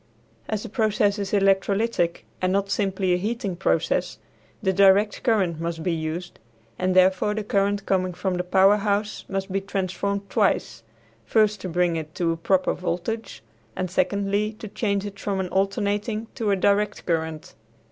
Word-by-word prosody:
As 215 -2 -2
the - - -7
process 210 -2 +1
is 200 -1 -3
electrolytic, 195 -1 +1 0.2
and 185 0 +1
not 195 +1 0
simply 195 -3 +1
a - - +3
heating 205 -1 -2
process, 185 - 0 0.5
the 190 -1 +2
direct 200 +2 +4
current 190 -9 +1
must 165 -1 -3
be 180 - 0
used, 165 +2 -4 0.4
and 185 0 +1
therefore 185 +3 +4
the 215 - -2
current 200 0 0
coming 185 -2 0
from 190 0 -1
the 180 0 -1
power 190 +3 +5
house 205 0 -1
must 195 0 -3
be 195 +1 0
transformed 195 +1 -2
twice; 195 - 0 0.4
first 210 - +2
to 185 - -4
bring 175 -1 +1
it 160 +1 -7
to 170 -2 +1
a 165 - -2
proper 185 +3 +1
voltage 180 - -4 0.3
and 185 -2 -3
secondly 200 +3 0
to 215 0 -9
change 200 -1 -1
it 200 -1 -7
from 195 -2 -2
an 185 -1 -2
alternating 205 +3 -1
to 225 -5 -2
a 200 - +4
direct 200 +2 +1
current. 160 -2 -2
195 Hz, 170 wpm, -24 LUFS, 180-205 Hz, 0.5 s, power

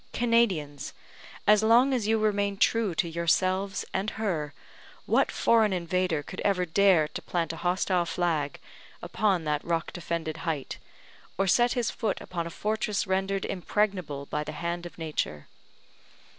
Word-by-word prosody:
Canadians! 190 - +1 0.5
as 210 0 +6
long 240 +5 +5
as 235 -5 0
you 225 0 +3
remain 205 -2 0
true 215 -4 +2
to 170 - +1
yourselves 185 +4 0
and 195 +3 -1
her, 170 -9 -1 0.5
what - - +2
foreign 220 -3 +3
invader 180 -3 0
could 185 - -9
ever 185 -3 +2
dare 180 -2 +4
to - - -6
plant 165 -2 -2
a - - -7
hostile 180 0 0
flag 160 -6 -1 0.4
upon 195 -6 +1
that 150 -1 -1
rock 165 -1 -2
defended 170 -2 -3
height, 160 -4 -4 0.6
or 195 - +2
set 240 +6 +3
his 240 -3 0
foot 215 -4 -2
upon 170 -2 -4
a - - -5
fortress 210 +3 -1
rendered 190 +1 -1
impregnable 180 -7 -1
by 150 +1 -3
the 155 - -6
hand 170 +3 -3
of - - -15
Nature? 150 - -3
185 Hz, 150 wpm, -28 LUFS, 165-205 Hz, 0.6 s, as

